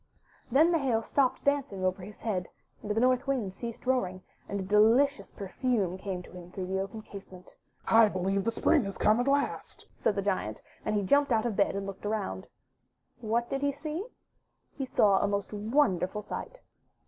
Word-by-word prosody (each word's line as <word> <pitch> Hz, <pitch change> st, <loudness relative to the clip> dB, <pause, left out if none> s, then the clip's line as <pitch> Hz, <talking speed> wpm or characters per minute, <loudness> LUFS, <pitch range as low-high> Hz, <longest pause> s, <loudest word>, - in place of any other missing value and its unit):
Then 310 Hz, +7 st, +5 dB
the 335 Hz, -, +3 dB
Hail 240 Hz, -5 st, +1 dB
stopped 260 Hz, +2 st, +1 dB
dancing 275 Hz, -10 st, 0 dB
over 185 Hz, +1 st, 0 dB
his 205 Hz, +3 st, -10 dB
head, 190 Hz, -5 st, -2 dB, 0.3 s
and 210 Hz, -, -8 dB
the 210 Hz, +1 st, +1 dB
North 255 Hz, +2 st, +2 dB
Wind 240 Hz, -9 st, -1 dB
ceased 235 Hz, +4 st, -7 dB
roaring, 185 Hz, -8 st, 0 dB, 0.3 s
and 200 Hz, -, -2 dB
a -, -, -2 dB
delicious 225 Hz, +8 st, +3 dB
per 200 Hz, -, -8 dB
fume 210 Hz, -5 st, 0 dB
came 190 Hz, -1 st, -5 dB
to -, -, -14 dB
him 180 Hz, -1 st, -11 dB
through 185 Hz, -1 st, -4 dB
the 190 Hz, +1 st, -2 dB
open 195 Hz, +3 st, -5 dB
casement. 190 Hz, -3 st, -12 dB, 0.3 s
*'I 225 Hz, -1 st, +6 dB
believe 195 Hz, +1 st, 0 dB
the 230 Hz, -, 0 dB
Spring 240 Hz, +3 st, +3 dB
has 195 Hz, -1 st, -5 dB
come 215 Hz, +2 st, +3 dB
at 245 Hz, -, 0 dB
last, 280 Hz, +1 st, -1 dB
said 210 Hz, -, 0 dB
the 200 Hz, -, -1 dB
Giant; 185 Hz, -, -2 dB, 0.2 s
and 215 Hz, -, -1 dB
he 205 Hz, -, +1 dB
jumped 280 Hz, +7 st, +3 dB
out 225 Hz, -1 st, +2 dB
of 230 Hz, -4 st, -1 dB
bed 200 Hz, 0 st, +2 dB
and 200 Hz, 0 st, -3 dB
looked 195 Hz, -1 st, -7 dB
out. 95 Hz, -, -3 dB, 0.7 s
What 235 Hz, +1 st, 0 dB
did 275 Hz, +2 st, -3 dB
he 285 Hz, 0 st, +2 dB
see? 305 Hz, -, -5 dB, 0.7 s
He 270 Hz, -2 st, -4 dB
saw 200 Hz, -5 st, +4 dB
a -, -, +1 dB
most 200 Hz, +1 st, -2 dB
wonderful 210 Hz, -3 st, +1 dB
sight. -, -, -7 dB
215 Hz, 195 wpm, -29 LUFS, 195-255 Hz, 0.7 s, I